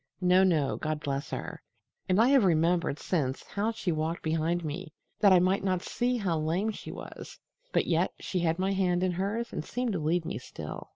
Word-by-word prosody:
No, 180 +1 +5
no, 160 -7 +2
God 155 -1 -2
bless 140 -2 -3
her! - - -5 0.5
And 185 +2 +3
I 235 +3 +5
have 270 -4 +5
remembered 170 -3 +2
since 140 -7 -1
how 210 +2 -1
she 205 -5 -2
walked 160 +1 -2
behind 165 +2 0
me, 150 0 -5 0.3
that 200 - +6
I 185 - +8
might 185 +2 +2
not 185 -2 0
see 245 0 0
how 180 -7 0
lame 175 +8 0
she - - -8
was, - - -9 0.3
but - - +2
yet - - +1
she 185 - -2
had 165 -1 +1
my 190 +1 0
hand 180 -2 +1
in 185 - +2
hers 200 +6 -2
and - - -3
seemed 245 +4 -2
to 185 - -1
lead 160 +2 0
me 110 - -4
still." 80 -11 -8
175 Hz, 210 wpm, -29 LUFS, 155-195 Hz, 0.5 s, I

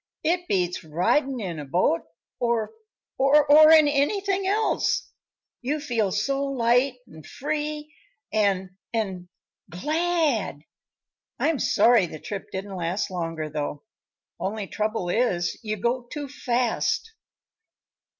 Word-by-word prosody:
"It 350 +2 0
beats 180 -2 0
ridin' 240 - +1
in 175 -7 -4
a 145 - -6
boat 165 +3 +1 0.4
or 235 -3 0 0.5
or 295 +3 +7
in 315 -2 +8
anything 385 +7 +1
else. 430 +3 +1 0.5
You 285 +5 -1
feel 230 -9 0
so 275 +8 0
light 250 -1 +2
an' 160 - -13
free 300 - -4 0.4
an' 190 -3 +1 0.2
an' 190 -5 -3 0.4
glad! 300 - 0 0.7
I'm 320 -4 +1
sorry 230 -6 +4
the 155 - -8
trip 195 +5 -7
didn't 195 +1 -5
last 180 +3 -2
longer, 165 -3 -3
though. 145 -1 -4 0.6
Only 205 +1 -3
trouble 215 -2 -2
is, 175 -5 0
you 215 -1 -2
go 240 +4 -1
too 290 -1 -5
fast." 255 - -1
235 Hz, 115 wpm, -25 LUFS, 185-295 Hz, 0.7 s, in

